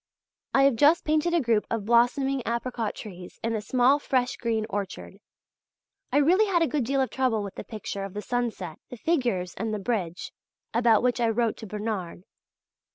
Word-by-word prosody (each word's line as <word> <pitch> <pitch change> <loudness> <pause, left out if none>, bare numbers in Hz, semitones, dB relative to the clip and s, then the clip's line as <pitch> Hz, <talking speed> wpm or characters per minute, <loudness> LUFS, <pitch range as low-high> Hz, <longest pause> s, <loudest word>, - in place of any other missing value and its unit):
I 270 - +6
have 275 -4 +4
just 300 +7 +4
painted 310 +3 +2
a - - +4
group 230 -6 +1
of 225 -3 -2
blossoming 245 +4 +3
apricot 235 -1 -2
trees 180 -4 -10
in 230 0 0
a 220 - -1
small 255 +6 +3
fresh 255 -3 0
green 225 -2 -1
orchard. 195 -1 -5 0.9
I - - +2
really 360 +9 +4
had 345 -4 +3
a - - +2
good 295 -3 0
deal 275 +2 +1
of 260 - -1
trouble 250 -5 0
with 200 - -6
the - - -7
picture 205 -3 -6
of 195 0 -7
the 210 - -3
sunset, 230 -9 -3
the 245 - -8
figures 235 - 0
and 215 +1 -3
the - - -3
bridge, 190 -5 -3 0.4
about 230 -1 +4
which 250 -1 +1
I 230 - +3
wrote 225 0 +1
to 220 - -8
Bernard. 205 -4 -4
235 Hz, 190 wpm, -26 LUFS, 210-265 Hz, 0.9 s, I